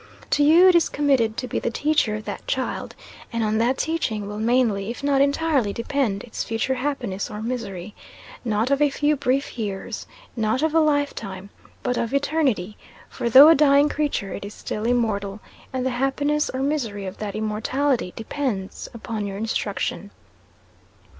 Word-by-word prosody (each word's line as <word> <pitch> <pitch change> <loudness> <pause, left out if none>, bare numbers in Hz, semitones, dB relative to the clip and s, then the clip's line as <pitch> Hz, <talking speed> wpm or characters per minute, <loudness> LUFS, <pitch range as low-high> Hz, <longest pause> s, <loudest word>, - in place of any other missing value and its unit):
To 290 - +3
you 335 +5 +7
is 340 -3 +4
it - - -14
committed 265 -7 +2
to 255 - -3
be - - -2
the - - -1
teacher 290 -4 +1
of 215 0 -6
that - - -6
child; - - -3 0.4
and 230 -1 -1
on 215 0 +1
that 245 +3 +2
teaching 230 -11 -1
will 210 +1 -5
mainly 225 -3 +1
if 240 +4 -6
not 280 -1 +3
entirely 280 -6 +2
depend 230 -5 -1
its 230 - -5
future 225 +4 -1
happiness 255 -8 -3
or 210 - -6
misery; 215 -5 -5 0.5
not 225 +2 0
of 280 +1 +2
a 295 - +5
few 295 +2 +1
brief 270 -2 -1
years 210 +1 -4 0.3
not 225 +4 0
of 315 -1 +1
a 325 - +5
life 290 -2 +2
time, 195 -1 -8 0.3
but 250 - 0
of 230 +4 -1
eternity; 275 - 0 0.3
for 235 - -3
though 275 +6 +10
a - - +9
dying 285 -1 +5
creature, 290 -11 -2
it - - -6
is 205 +1 -8
still 210 +1 -4
immortal, 215 -4 0 0.3
and 260 -1 -2
the 260 - +1
happiness 285 +4 0
or 260 +1 -2
misery 235 -9 -2
of 190 +1 -7
that 210 -2 -4
immortality 220 +2 0
depends 225 -5 -4
upon 220 -2 -4
your 195 0 -5
instruction. 205 -2 -2
245 Hz, 175 wpm, -23 LUFS, 210-285 Hz, 0.5 s, though